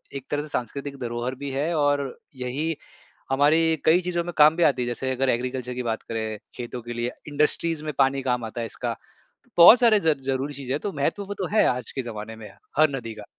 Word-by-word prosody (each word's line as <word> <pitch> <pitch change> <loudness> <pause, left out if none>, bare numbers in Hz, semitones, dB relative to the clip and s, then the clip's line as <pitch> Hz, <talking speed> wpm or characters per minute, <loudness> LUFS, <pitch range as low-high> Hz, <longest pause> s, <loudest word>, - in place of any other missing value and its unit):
एक 135 -1 -6
तरह 145 0 0
से 150 - -8
सांस्कृतिक 140 +1 -4
धरोहर 120 +1 -3
भी 140 +2 -6
है, 150 +6 -1
और 145 -3 +1 0.2
यही 135 +6 -2 0.6
हमारी 160 +4 +3
कई 170 +3 +5
चीज़ों 175 -1 -1
में 175 - -5
काम 155 +1 +6
भी 175 - 0
आती 135 -5 +3
है। 120 - -2
जैसे 125 +2 -2
अगर 130 +1 0
एग्रीकल्चर 125 +1 -2
की 125 - -3
बात 115 -2 -2
करें, 110 -1 -4 0.2
खेतों 120 0 -6
के 120 +1 -6
लिए, 120 +1 -2 0.2
इंडस्ट्रीज़ 150 +2 +1
में 155 - -3
पानी 135 0 +3
काम 125 -2 -1
आता 110 +2 -5
है 115 - -2
इसका। - - -4 0.6
बहुत 220 +9 +10
सारे 225 -4 +5
ज 160 -3 +3
ज़रूरी 135 +2 -2
चीज़ 135 -1 -5
है 140 - 0
तो 200 +6 -4
महत्व 150 +7 -1
वो 200 +1 -5
तो 190 -2 -3
है, - - +6
आज 125 -1 -1
के 135 - -3
ज़माने 110 -1 -7
में 105 -2 -10 0.3
हर 155 -1 +6
नदी 115 -3 -6
का। 105 -1 -10
135 Hz, 230 wpm, -25 LUFS, 120-155 Hz, 0.6 s, बहुत